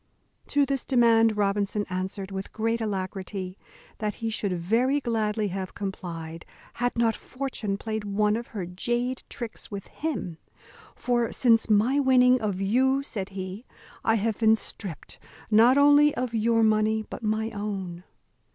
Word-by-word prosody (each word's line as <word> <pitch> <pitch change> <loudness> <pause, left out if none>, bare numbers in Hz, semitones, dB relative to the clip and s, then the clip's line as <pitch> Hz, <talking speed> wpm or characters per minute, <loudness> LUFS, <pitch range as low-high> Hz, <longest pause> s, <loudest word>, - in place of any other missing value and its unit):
To 285 -1 +3
this 275 -1 -2
demand 225 -4 +4
Robinson 205 0 0
answered, 190 +1 -4
with 190 0 -5
great 230 +1 -1
alacrity, 190 -2 -4 0.4
that 210 -2 -2
he 225 -1 -3
should 200 -5 -1
very 240 +11 +2
gladly 220 -4 -1
have 190 0 -5
complied, 165 -4 -6 0.4
had 245 0 +1
not 230 -2 +2
fortune 250 -7 -4
played 220 0 -4
one 210 +1 +1
of 235 +1 -4
her 200 -5 -5
jade 240 +8 -2
tricks 235 -5 -6
with 200 -2 -6
him: 225 - -4 0.6
"for 240 -2 0
since 230 -3 +3
my 225 +7 +3
winning 255 -2 +5
of 205 -4 -2
you," 260 +7 +2
said 200 -8 -4
he, 190 +5 -6 0.4
"I 225 - +3
have 220 0 -1
been 220 -1 +5
stript 195 -6 -7 0.3
not 235 +5 +6
only 290 +1 +6
of 250 -2 -2
your 225 0 +2
money 215 0 +2
but - - -8
my 220 +1 -1
own." 195 -4 -5
220 Hz, 150 wpm, -26 LUFS, 195-240 Hz, 0.6 s, not